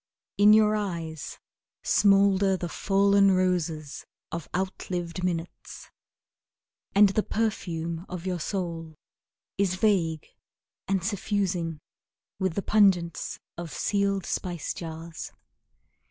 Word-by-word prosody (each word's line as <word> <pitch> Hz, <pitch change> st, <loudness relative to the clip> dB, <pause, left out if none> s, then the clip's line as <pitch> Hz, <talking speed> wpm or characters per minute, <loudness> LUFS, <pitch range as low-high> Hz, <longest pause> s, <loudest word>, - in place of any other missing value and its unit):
In 205 Hz, +1 st, +8 dB
your 215 Hz, 0 st, +5 dB
eyes 170 Hz, -7 st, -4 dB, 0.5 s
Smoulder 195 Hz, -1 st, +4 dB
the 175 Hz, -, -4 dB
fallen 200 Hz, +1 st, +3 dB
roses 165 Hz, -6 st, -1 dB, 0.3 s
of 170 Hz, -3 st, -5 dB
out 185 Hz, +1 st, -3 dB
lived 175 Hz, -1 st, -3 dB
minutes, 175 Hz, -1 st, -5 dB, 1.0 s
And 205 Hz, 0 st, +7 dB
the 205 Hz, +3 st, +1 dB
perfume 170 Hz, -6 st, -2 dB
of 180 Hz, -1 st, -6 dB
your 180 Hz, -2 st, -2 dB
soul 165 Hz, -3 st, -4 dB, 0.6 s
Is 190 Hz, -2 st, +2 dB
vague 180 Hz, -6 st, +1 dB, 0.6 s
and 190 Hz, -2 st, 0 dB
suffusing, 190 Hz, -5 st, -1 dB, 0.6 s
With 190 Hz, -3 st, 0 dB
the 200 Hz, -, -1 dB
pungence 185 Hz, -6 st, +2 dB, 0.2 s
of 170 Hz, -2 st, -6 dB
sealed 200 Hz, -2 st, 0 dB
spice 175 Hz, -3 st, -3 dB
jars. 165 Hz, 0 st, -7 dB
185 Hz, 105 wpm, -27 LUFS, 170-200 Hz, 1.0 s, In